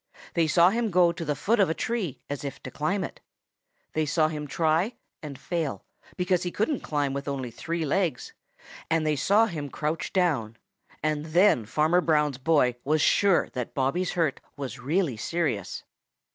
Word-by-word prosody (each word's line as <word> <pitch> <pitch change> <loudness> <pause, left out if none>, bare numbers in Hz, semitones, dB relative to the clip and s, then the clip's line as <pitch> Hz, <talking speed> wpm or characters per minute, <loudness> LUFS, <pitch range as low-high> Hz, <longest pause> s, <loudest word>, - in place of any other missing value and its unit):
They 165 -2 +2
saw 170 +3 +5
him 230 0 0
go 180 -2 +4
to 170 0 -6
the 150 -2 -1
foot 225 +9 +1
of 195 - +4
a 160 - 0
tree 215 - -3
as 145 0 -5
if 140 -1 -6
to - - -7
climb 185 +6 -1
it. - - -7 0.7
They 155 -1 0
saw 155 +1 +2
him 150 -1 -5
try 165 - +1 0.3
and 145 -3 -7
fail, 160 0 -3 0.3
because 180 0 +1
he 175 - -2
couldn't 220 - -1
climb 145 -3 -1
with 140 +1 -4
only 135 -4 -3
three 165 +6 -3
legs, 165 -3 -1 0.6
and 160 -1 +1
they 155 -1 +2
saw 205 +9 +4
him 155 -9 -5
crouch 155 +4 -3
down 140 - 0 0.5
then 155 -1 0
that 160 - +3
Farmer 160 +6 +3
Brown's 150 -5 +1
boy 135 -4 +2
was 155 +3 +2
sure 200 -3 +3
that 125 -2 -5
Bobby's 155 +7 0
hurt 165 -6 0 0.2
was 135 -1 -5
really 145 - 0
serious. 125 - -2
155 Hz, 175 wpm, -27 LUFS, 140-180 Hz, 0.7 s, saw